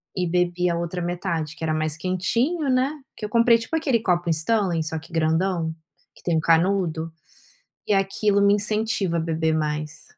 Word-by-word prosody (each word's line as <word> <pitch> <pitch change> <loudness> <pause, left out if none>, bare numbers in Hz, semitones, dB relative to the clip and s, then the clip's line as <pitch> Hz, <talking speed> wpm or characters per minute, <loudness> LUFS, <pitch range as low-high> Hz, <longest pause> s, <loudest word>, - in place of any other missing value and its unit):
e 180 -2 -1
bebi 180 +1 +1
a 170 - 0
outra 170 +1 -3
metade 170 -3 -3
que - - -10
era 160 - 0
mais 155 -1 0
quentinho, 230 - -1
né, 255 +2 +2 0.2
que - - -13
eu 210 - -2
comprei 230 +1 +4
tipo 230 +8 -4
aquele 280 -8 +1
copo 175 -5 0
Stanley 175 0 +1
só 160 +1 -3
que 160 +2 -11
grandão, 160 +1 0 0.4
que - - -19
tem 170 -2 0
um - - +3
canudo, 165 -1 +1 0.8
e 210 - +3
aquilo 200 +1 +1
me 200 0 +5
incentiva 210 -3 +1
a 165 - +1
beber 160 -1 0
mais. 150 0 -3
175 Hz, 185 wpm, -23 LUFS, 160-205 Hz, 0.8 s, me